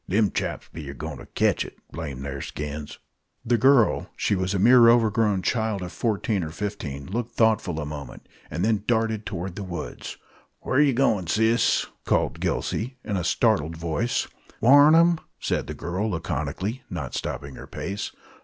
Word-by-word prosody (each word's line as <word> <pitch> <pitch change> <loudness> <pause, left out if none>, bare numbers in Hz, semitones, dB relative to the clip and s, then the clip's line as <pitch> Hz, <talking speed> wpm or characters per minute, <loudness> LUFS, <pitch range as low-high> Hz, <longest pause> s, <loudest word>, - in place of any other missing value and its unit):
Them 105 +2 +2
chaps - - -3
be 75 -3 -7
a 70 - -7
goin' - - -6
ter - - -11
ketch - - +2
it, - - -11
blame 70 -5 -6
the'r 70 -1 -5
skins!" 75 0 -6 0.5
The 120 - +3
girl 130 -2 +4
she - - +1
was 95 0 0
a - - +2
mere 120 +4 +7
overgrown 110 -4 +3
child 110 -5 0
of 90 - -6
fourteen 105 -3 -1
or 80 - -4
fifteen 80 -7 -5
looked 115 - -4
thoughtful 110 -7 +2
a 75 - -3
moment, 75 -1 -8 0.2
and 85 +6 -1
then 110 -3 +1
darted 110 -3 0
toward 85 +1 -4
the 100 - -5
woods. 90 -2 -6 0.5
"Whar 130 - +2
yer 145 -3 +4
goin', 110 -8 +2
sis?" 110 +5 +3 0.2
called - - 0
Gillsey, 125 +4 -2
in 105 - -2
a 90 - -1
startled 85 - +1
voice. 85 +9 -1 0.3
"Warn 145 +5 +7
'em!" 170 0 +5 0.2
said - - -1
the - - -5
girl, 95 +6 -2
laconically, 85 - -3
not - - -5
stopping 70 -1 -4
her - - -10
pace. 100 +2 -4
100 Hz, 175 wpm, -25 LUFS, 80-115 Hz, 0.5 s, mere